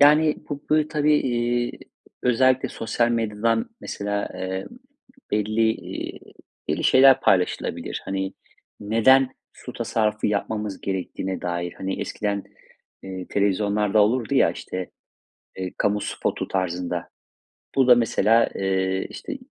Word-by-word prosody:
Yani, 150 +1 +6
bu, 145 -1 -5
böyle, 155 0 +3
tabii, 150 0 +2
iii, 120 -2 0 0.5
özellikle 130 +1 +3
sosyal 120 +1 0
medyadan, 115 - 0
mesela, 105 0 -3
eee, 95 0 -4 0.7
belli, 110 +2 +2
iii, - - -6 0.5
belli - - -1
şeyler 135 0 +7
paylaşılabilir. 90 -2 0
Hani, 95 0 -2 0.5
neden 125 +5 +4 0.2
su - - -10
tasarrufu 105 -1 0
yapmamız 105 -1 -2
gerektiğine 95 0 -3
dair, 85 0 -2
hani, 95 0 -4
eskiden, 100 -1 -2 0.6
eee, 95 -1 -6
televizyonlarda 105 +1 +2
olurdu 115 +1 +1
ya, - - +5
işte, 90 -1 -6 0.7
eee, 95 -1 -4
kamu 105 0 +1
spotu - - -3
tarzında, 90 -2 -2 0.7
bu 135 -2 +4
da, 125 - +10
mesela, 115 -1 +3
eee, 95 0 0
işte, 290 -3 -6
105 Hz, 115 wpm, -24 LUFS, 95-125 Hz, 0.7 s, da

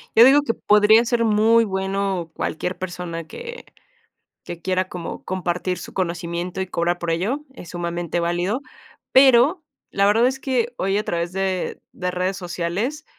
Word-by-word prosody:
Yo 230 - +9
digo 280 +3 +7
que 230 - 0
podría 210 +2 +5
ser 235 -1 +1
muy 220 +2 +4
bueno 190 -3 -2
cualquier 180 +3 -3
persona, 175 -2 -5
que 475 - -9 0.8
que 170 -1 -8
quiera 185 0 0
como 175 -2 -6
compartir 180 0 -2
su - - -9
conocimiento, 175 0 -3
y 190 - -3
cobrar 175 0 0
por 170 -1 -2
ello, 210 - -1
es 175 - -11
sumamente 175 -1 -3
válido, 175 +9 -1 0.5
pero, 265 +6 +6 0.3
la 200 0 +2
verdad 225 +4 +4
es 265 +1 0
que 245 -3 -1
hoy 195 +2 0
a 210 - 0
través 170 +1 -2
de 190 -1 -2
de 180 -1 -3
redes 185 +2 -1
sociales, 185 - -3
190 Hz, 160 wpm, -22 LUFS, 175-230 Hz, 0.8 s, Yo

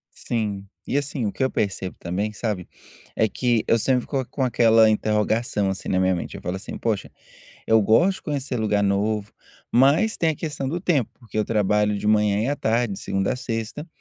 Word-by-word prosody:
Sim, 105 -4 -3 0.2
e, - - -1
assim, 140 -4 -2
o 100 - -2
que 130 - -1
eu 130 - +1
percebo 95 -2 -2
também, 95 +5 -2
sabe, 105 -4 -3 0.5
é 110 - +2
que 120 0 0
eu 115 - +4
sempre 125 +3 +2
fico 135 0 -2
com 135 - -3
aquela 115 -3 +5
interrogação, 105 -1 0
assim, 95 - -5
na 95 - +2
minha 95 0 +3
mente, 85 - -5
eu - - -11
falo 90 +2 -3
assim: 95 - -7
"Poxa, 110 -4 -2 0.6
eu 110 0 +5
gosto 175 - +4
de - - -21
conhecer 140 -4 -3
lugar 105 -2 +1
novo", 100 +1 0 0.4
mas 140 - +4
tem 165 -1 +2
a - - -1
questão 145 -4 -4
do 170 +4 -2
tempo, 150 - +1
porque 115 -4 -11
eu 105 - +2
trabalho 105 -1 +1
de 105 - -4
manhã 105 -1 +3
e 125 - 0
à 145 - 0
tarde, 115 -1 0
de - - -8
segunda 95 0 -1
à - - -3
sexta, 115 +4 -4
110 Hz, 210 wpm, -23 LUFS, 105-130 Hz, 0.6 s, aquela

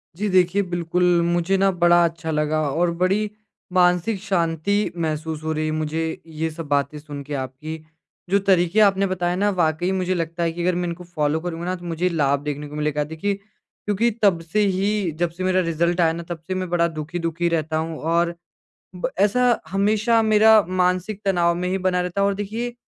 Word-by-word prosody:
जी। 210 +5 -2
देखिए 185 +1 +3
बिल्कुल 175 +1 0 0.2
मुझे 175 +2 +1
ना 195 +1 +3
बड़ा 175 -1 +4
अच्छा 165 -1 -3
लगा। 155 0 0
और 170 +5 +1
बड़ी 200 +3 +2 0.4
मानसिक 180 +3 +3
शांति 190 +1 0
महसूस 155 -1 -3
हो 160 - -2
रही 155 0 -1
है 155 - -1
मुझे 155 +1 -2
ये 160 0 -3
सब 155 0 -7
बातें 145 +1 0
सुन 145 -1 -8
के 145 - -7
आपकी। 135 +5 -5 0.5
जो 200 +2 +3
तरीके 180 +1 +3
आपने 195 -1 +4
बताए 180 -1 -1
ना 205 +2 +1
वाक़ई 165 +2 +1
मुझे 185 -1 0
लगता 170 0 -2
है 165 - +1
कि 170 +1 -6
अगर 180 0 +1
मैं 175 0 -1
इनको 170 +1 -6
फ़ॉलो 155 -3 -1
करूँगा 170 0 -5
ना 185 +1 -1
तो 175 -1 -11
मुझे 170 +2 -1
लाभ 140 -5 +1
देखने 150 0 -4
को 145 - -10
मिलेगा। 150 0 0
देखिए 160 +7 -2
क्योंकि 210 +2 -3
तब 190 -4 +4
से 165 +6 -2
ही 195 -1 0
जब 175 -1 +1
से 180 +3 -6
मेरा 185 0 +2
रिज़ल्ट 170 +1 0
आया 165 -1 +3
ना 170 +1 -6
तब 170 -1 -4
से 185 - -2
मैं 185 -1 -3
बड़ा 170 -1 +2
दुखी-दुखी 165 +1 -3
रहता 155 -1 -1
हूँ। 160 0 -3
और 170 +2 0 0.6
ब 180 - -2
ऐसा 235 +4 +3
हमेशा 215 +4 +2
मेरा 220 0 +6 0.2
मानसिक 185 +3 0
तनाव 175 -3 +2
में 180 +1 -2
ही 190 +1 0
बना 185 -1 +1
रहता 180 +2 -2
है। 200 - +3
और 200 - +1
देखिए 225 +4 -4
175 Hz, 200 wpm, -22 LUFS, 160-190 Hz, 0.6 s, मेरा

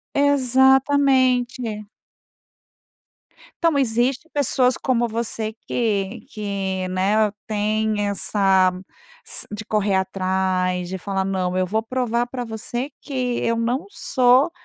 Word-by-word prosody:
Exatamente. 260 -4 +3 1.8
Então, 330 -3 +3
existe 255 +4 0
pessoas 260 -3 +2
como 240 -2 +1
você 225 -1 -3
que 210 -1 -1
que, 195 -3 -3
né, 200 +3 +2 0.2
tem 215 0 0
essa 195 -2 +2 0.5
s - - -8
de 210 +1 -6
correr 210 -2 +1
atrás, 185 -1 0
de 190 +2 -4
falar: 195 +1 -2
"Não, 185 -1 -1
eu 185 - +2
vou 215 +4 -1
provar 240 0 -1
pra 245 0 -5
você 240 +4 -5
que 255 -4 -2
eu 230 0 0
não 240 +4 -1
sou 255 -3 +3
220 Hz, 110 wpm, -22 LUFS, 195-255 Hz, 1.8 s, Exatamente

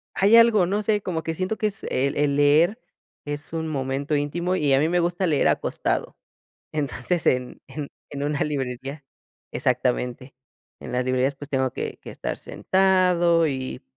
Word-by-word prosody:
ay 205 +4 +5
algo, 230 -5 +6
no 205 +3 0
sé, 210 0 +1
como 170 -4 -3
que 165 - -2
siento 185 +6 -2
que 215 - +1
es 200 - -6
el 140 +2 0
el 145 -1 +2
leer 155 +9 +4 0.5
es 145 +1 -5
un 160 -1 -2
momento 140 +1 -2
íntimo, 170 +5 -1
y 145 -6 +2
a 135 - +5
mí 155 +3 +2
me 175 +1 +2
gusta 175 +2 0
leer 150 -4 +2
acostado. - - -1 0.6
Entonces, 150 +3 -2
en 125 -1 0
en 150 -2 -6 0.2
en 140 0 -5
una 145 0 -1
librería 135 0 -4 0.5
exactamente, 125 0 -1 0.5
en - - -8
las 125 0 0
librerías, 130 +2 +1
pues, 145 +1 -10
tengo 130 -1 +1
que - - -5
que - - -9
estar - - -4
sentado 180 -3 +2
y, 130 -2 -4
150 Hz, 170 wpm, -24 LUFS, 135-180 Hz, 0.6 s, algo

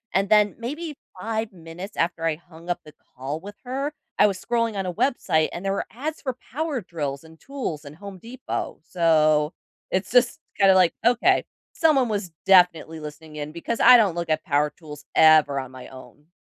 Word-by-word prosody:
and 195 +1 +2
then, 210 -1 +4
maybe 300 +6 -5 0.2
5 220 +1 -3
minutes 175 +3 -10
after 165 -1 -1
I 160 -2 +1
hung 170 +1 -15
up 175 - -1
the 150 -2 -14 0.2
call 135 +5 -4
with 205 +3 -10
her, 270 +4 -3 0.3
I 210 - +7
was 195 -2 -3
scrolling 230 -3 0
on 190 - -2
a 180 - -3
website 170 - +1
and 180 +3 -7
there 195 - +1
were 200 - -2
ads 300 +7 -5
for 260 -3 -4
power 295 -3 -2
drills, 145 -5 -5
and 160 0 -16
tools, 255 - -5
and 145 +1 -10
Home 195 0 -10
Depot 240 +5 -5
so 155 -3 +2 0.4
it's 190 +1 -1
just, 245 +4 +3 0.2
kinda 195 -1 +6
like, 185 -2 +4
"Okay, 245 +11 +3 0.3
someone 285 -6 +3
was 200 -4 -2 0.2
definitely 180 -4 +4
listening 150 0 -10
in 150 0 -5
because 170 +8 -4
I 250 - +9
don't 205 -7 +3
look 170 -1 -3
at 155 0 0
power 145 0 +1
tools 150 -2 -12
ever 155 -3 +6
on 130 -1 -7
my 130 -1 -10
own." 140 +3 -14
180 Hz, 195 wpm, -24 LUFS, 155-230 Hz, 0.4 s, I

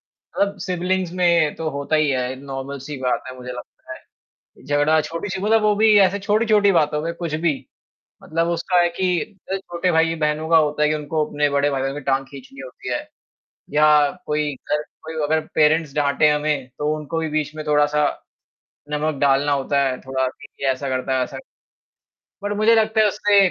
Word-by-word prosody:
मतलब 200 0 -3
सिब्लिंग्स 180 0 -1
में 170 -3 +3
तो 160 -1 -3
होता 140 +2 -2
ही 155 -1 +2
है 130 -1 -1
नॉर्मल 135 0 -6
सी 145 -2 -5
बात 125 - 0
है 130 - -8
मुझे 125 0 -7
लगता 125 - -10 0.4
है। - - -24
झगड़ा 145 +2 +3
छोटी-सी 185 +5 -5
मतलब 220 +2 +3
वो 210 -1 +3
भी 215 0 +5
ऐसे 195 +1 +3
छोटी-छोटी 210 0 +3
बातों 150 -3 +1
में 170 0 -2
कुछ 170 -3 -5
भी 155 -4 +3 0.7
मतलब 165 +1 -1
उसका 170 +2 +1
है 175 - +3
कि 180 0 0 0.3
अ, 195 - +1
छोटे 180 -1 -2
भाई-बहनों 160 -1 +1
का 165 - +6
होता 150 -1 +2
है 150 - +4
कि 155 - +1
उनको 150 +1 -1
अपने 145 -1 0
बड़े 140 +1 +2
भाइयों 135 0 -2
की 145 - -5
टाँग 135 -1 0
खींचनी 135 -1 -12
होती 130 -1 -9
है - - -3 0.7
या 150 +1 +5 0.4
कोई 150 -1 -1
घर 150 +3 -2 0.2
कोई 160 0 -7
अगर 155 +2 +2 0.2
पेरेंट्स 155 -1 +3
डाँटें 145 +1 +3
हमें 150 -3 -1
तो 150 +1 0
उनको 155 +2 -5
भी 160 - -2
बीच 150 -1 -2
में 155 -1 -6
थोड़ा-सा 150 0 +2 0.9
नमक 150 +1 -1
डालना 140 +1 +3
होता 140 0 +1
है 130 -2 -1
थोड़ा 130 0 -1
कि 135 +2 -10 0.2
ये - - +3
ऐसा 130 +1 -4
करता 130 0 -1
है 130 - +1
ऐसा - - -7 1.1
बट 205 0 -2
मुझे 215 +2 +4
लगता 220 0 +2
है 215 - +5
उससे 205 0 +1
150 Hz, 190 wpm, -21 LUFS, 140-175 Hz, 1.1 s, का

